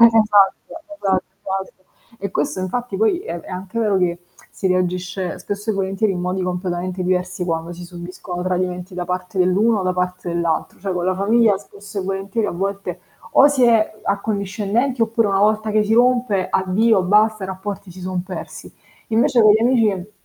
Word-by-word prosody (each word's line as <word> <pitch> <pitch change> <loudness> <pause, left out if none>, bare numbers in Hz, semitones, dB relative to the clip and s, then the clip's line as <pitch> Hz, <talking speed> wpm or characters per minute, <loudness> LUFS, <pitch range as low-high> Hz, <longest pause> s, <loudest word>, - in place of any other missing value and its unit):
Esatto. 215 -4 +6 0.4
Esatto, 190 -9 0 0.2
esatto. 190 -1 -5 0.3
E 200 -1 -4
questo 185 - -1
infatti 200 +3 -3
poi 220 +11 +2
è 175 - -5
è - - -14
anche 185 +4 -5
vero 210 -4 +2
che 175 -1 0 0.3
si 195 - -3
reagisce 180 0 -1
spesso 205 +2 -6
e - - -1
volentieri 195 +2 0
in 180 - -3
modi 180 +1 -1
completamente 180 0 -3
diversi 180 0 -1
quando 165 0 -2
si 175 +1 -9
subiscono 175 +1 -7
tradimenti 180 0 -2
da 180 0 -3
parte 180 +1 -4
dell'uno 200 +4 +3
o - - -2
da 185 0 +1
parte 180 0 -2
dell'altro, 170 -2 -1
cioè 195 0 -2
con 175 -1 -1
la 185 +1 +1
famiglia 210 +2 +3
spesso 205 0 -10
e - - -3
volentieri 195 +3 -2
a - - -2
volte 195 0 -3 0.3
o 280 - +7
si 275 -3 +3
è 220 -2 +3
accondiscendenti, 210 +5 -1
oppure 225 -1 +2
una 195 0 +2
volta 215 +1 +2
che 215 0 +2
si 215 - 0
rompe, 240 -5 +3
addio 190 +2 +3
basta, 210 +2 +3
i - - -4
rapporti 190 0 -6
si 180 +2 -11
son 185 -1 -3
persi. 185 0 -8 0.4
Invece 230 +2 +3
con 215 -1 +7
gli 215 - +3
amici, 215 -6 +2
195 Hz, 185 wpm, -20 LUFS, 180-215 Hz, 0.4 s, o